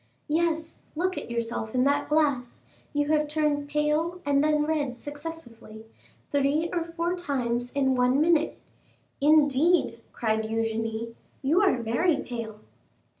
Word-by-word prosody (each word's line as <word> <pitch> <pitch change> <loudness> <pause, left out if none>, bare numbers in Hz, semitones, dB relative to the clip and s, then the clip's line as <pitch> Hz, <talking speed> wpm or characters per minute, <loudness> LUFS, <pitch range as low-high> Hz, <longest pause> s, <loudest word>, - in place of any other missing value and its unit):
"Yes, 325 0 -1
look 370 +3 0
at - - -6
yourself 230 -1 -3
in 250 - +3
that 280 +1 +1
glass; 285 -5 0 0.3
you 290 -1 0
have 305 -1 +2
turned 295 -1 0
pale 300 +4 0
and 285 0 +3
then 300 -1 +2
red 290 -6 -1
successively, 290 -8 -9 0.5
three 285 +4 +1
or 345 -2 0
four 335 +1 -2
times 245 -8 -2
in 265 -2 +2
one 250 +1 +3
minute." 325 0 +2 0.6
"Indeed," 295 -2 +4
cried 220 -1 0
Eugénie, 225 +1 -2 0.3
"you 315 +8 +3
are 385 -9 +3
very 295 +10 +2
pale!" 230 -6 -6
290 Hz, 130 wpm, -27 LUFS, 240-315 Hz, 0.6 s, Indeed